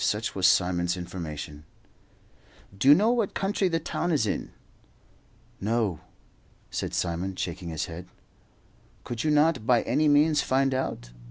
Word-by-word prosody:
Such 105 Hz, +2 st, 0 dB
was 95 Hz, -2 st, +3 dB
Simon's 90 Hz, -1 st, +2 dB
information. 80 Hz, -4 st, -7 dB, 1.1 s
"Do 100 Hz, -, -1 dB
you 145 Hz, -, +10 dB
know 215 Hz, +6 st, +3 dB
what 230 Hz, -5 st, 0 dB
country 195 Hz, 0 st, 0 dB
the 165 Hz, -2 st, 0 dB
town 175 Hz, +2 st, -2 dB
is 145 Hz, -8 st, +2 dB
in?" 105 Hz, -, -2 dB, 1.1 s
"No," 105 Hz, -5 st, 0 dB, 0.7 s
said -, -, -3 dB
Simon, 90 Hz, +2 st, -2 dB
shaking 85 Hz, -1 st, -4 dB
his 80 Hz, 0 st, -3 dB
head. 85 Hz, +2 st, -9 dB, 1.0 s
"Could 120 Hz, -1 st, -4 dB
you 155 Hz, -, +1 dB
not 150 Hz, -5 st, +2 dB
by 120 Hz, -2 st, +4 dB
any 155 Hz, -, +1 dB
means 150 Hz, +1 st, +4 dB
find 135 Hz, +1 st, +1 dB
out? -, -, -3 dB
110 Hz, 145 wpm, -27 LUFS, -, 1.1 s, you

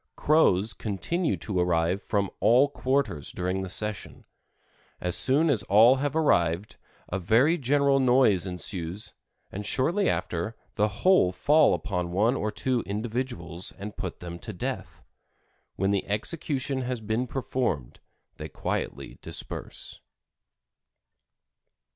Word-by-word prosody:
Crows 110 Hz, -, +3 dB
continue 110 Hz, -, -2 dB
to 95 Hz, +3 st, -3 dB
arrive 90 Hz, +2 st, +1 dB
from 100 Hz, -2 st, -1 dB
all 130 Hz, +5 st, +4 dB
quarters 135 Hz, -, -1 dB
during 90 Hz, +1 st, -2 dB
the 95 Hz, -, -5 dB
session. 105 Hz, +3 st, -5 dB, 0.7 s
As 90 Hz, -1 st, +1 dB
soon 145 Hz, +5 st, +5 dB
as 135 Hz, -10 st, +3 dB
all 115 Hz, +8 st, +5 dB
have 145 Hz, +2 st, -2 dB
arrived 90 Hz, -, +1 dB, 0.3 s
a 95 Hz, -, -2 dB
very 115 Hz, -, +3 dB
general 140 Hz, -1 st, +2 dB
noise 125 Hz, -8 st, +3 dB
ensues, 90 Hz, +1 st, -2 dB, 0.4 s
and 100 Hz, -, -5 dB
shortly 170 Hz, -, +1 dB
after 90 Hz, +6 st, -2 dB, 0.2 s
the 105 Hz, -, +2 dB
whole 110 Hz, -, +3 dB
fall 145 Hz, +12 st, +4 dB
upon 90 Hz, -4 st, -3 dB
one 110 Hz, +8 st, +2 dB
or 105 Hz, -4 st, -2 dB
two 120 Hz, +3 st, -1 dB
individuals 105 Hz, -5 st, -3 dB
and 100 Hz, +1 st, -8 dB
put 95 Hz, -4 st, -6 dB
them 85 Hz, -1 st, -7 dB
to 110 Hz, -, -7 dB
death. 90 Hz, -, -5 dB, 0.7 s
When 95 Hz, +1 st, 0 dB
the 100 Hz, -2 st, -1 dB
execution 135 Hz, +4 st, -2 dB
has 125 Hz, -1 st, -3 dB
been 110 Hz, +3 st, -2 dB
performed 120 Hz, -, -3 dB, 0.4 s
they -, -, -7 dB
quietly -, -, -4 dB
disperse." -, -, -5 dB
105 Hz, 125 wpm, -27 LUFS, 95-130 Hz, 0.7 s, soon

